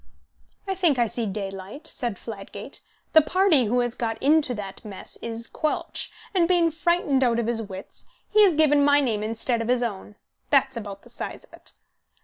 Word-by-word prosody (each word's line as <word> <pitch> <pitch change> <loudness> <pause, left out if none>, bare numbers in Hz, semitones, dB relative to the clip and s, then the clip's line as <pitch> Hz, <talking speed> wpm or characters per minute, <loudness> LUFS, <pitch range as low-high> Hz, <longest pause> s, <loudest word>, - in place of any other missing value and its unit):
"I 385 - 0
think 350 -7 +2
I 240 - +4
see 230 0 -2
daylight," 195 - -6
said 240 -9 -3
Fladgate. 205 +3 -8 0.3
"The 315 - +9
party 335 -4 +3
who 245 +4 +2
has 240 -1 -1
got 225 -3 -2
into 290 -3 +3
that 195 -2 -7
mess 205 -3 -8
is 230 0 -4
Quelch, 310 -1 -2 0.2
and, 350 -3 +3
being 345 -2 +3
frightened 320 -4 +2
out 235 -2 +3
of 235 - 0
his 230 0 +1
wits, 195 -2 -8 0.2
he 425 0 +5
has 375 -6 +5
given 295 -2 +4
my 285 0 +5
name 230 -7 0
instead 230 +2 -1
of 225 - -3
his 245 0 +2
own. 205 -2 -5 0.3
That's 275 -2 +3
about 200 -3 -7
the 240 - -13
size 240 - -5
of - - -15
it!" - - -5
245 Hz, 190 wpm, -25 LUFS, 220-300 Hz, 0.3 s, The